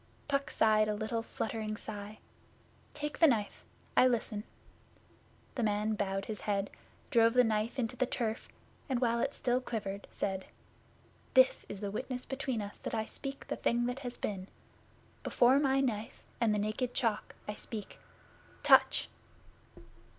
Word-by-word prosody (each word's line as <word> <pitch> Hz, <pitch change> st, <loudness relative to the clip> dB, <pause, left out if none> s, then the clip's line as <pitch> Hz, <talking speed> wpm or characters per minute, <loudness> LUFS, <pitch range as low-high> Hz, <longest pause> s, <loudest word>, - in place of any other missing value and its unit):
Puck 280 Hz, -1 st, 0 dB
sighed 215 Hz, -1 st, +4 dB
a 210 Hz, -, 0 dB
little 220 Hz, +2 st, -1 dB
fluttering 220 Hz, -1 st, -3 dB
sigh. 210 Hz, 0 st, -7 dB, 0.8 s
'Take 295 Hz, 0 st, -4 dB
the 325 Hz, -, +8 dB
knife. 220 Hz, -7 st, 0 dB, 0.3 s
I 255 Hz, -, +7 dB
listen.' 220 Hz, -3 st, 0 dB, 1.1 s
The 250 Hz, -, -2 dB
man 210 Hz, 0 st, +1 dB
bowed 195 Hz, -2 st, -1 dB
his 215 Hz, -2 st, -5 dB
head, 200 Hz, -1 st, -1 dB, 0.4 s
drove 230 Hz, -2 st, +5 dB
the 250 Hz, -, +7 dB
knife 225 Hz, +2 st, 0 dB
into 250 Hz, -1 st, -1 dB
the 255 Hz, 0 st, +1 dB
turf, 225 Hz, -2 st, -2 dB, 0.4 s
and 255 Hz, -2 st, +1 dB
while 235 Hz, -1 st, +2 dB
it 275 Hz, +3 st, 0 dB
still 250 Hz, 0 st, +1 dB
quivered 205 Hz, -5 st, -4 dB
said: 190 Hz, -1 st, -3 dB, 0.9 s
'This 260 Hz, 0 st, +5 dB
is 200 Hz, -, -6 dB
witness 250 Hz, +5 st, -3 dB
between 265 Hz, -5 st, -2 dB
us 205 Hz, -, -8 dB
that -, -, -3 dB
I 220 Hz, -1 st, 0 dB
speak 275 Hz, +4 st, -5 dB
the -, -, -2 dB
thing 240 Hz, 0 st, +1 dB
that 245 Hz, +2 st, -2 dB
has 245 Hz, -3 st, -5 dB
been. 190 Hz, -2 st, -3 dB, 0.7 s
Before 255 Hz, +3 st, +4 dB
my 270 Hz, -1 st, +3 dB
Knife 225 Hz, -5 st, -2 dB, 0.2 s
and 230 Hz, -2 st, +3 dB
the 210 Hz, -, +2 dB
Naked 215 Hz, +4 st, -1 dB
Chalk 225 Hz, -4 st, 0 dB
I 210 Hz, -, -2 dB
speak. 210 Hz, 0 st, -6 dB, 0.6 s
Touch! -, -, +6 dB
225 Hz, 150 wpm, -33 LUFS, 210-250 Hz, 1.1 s, the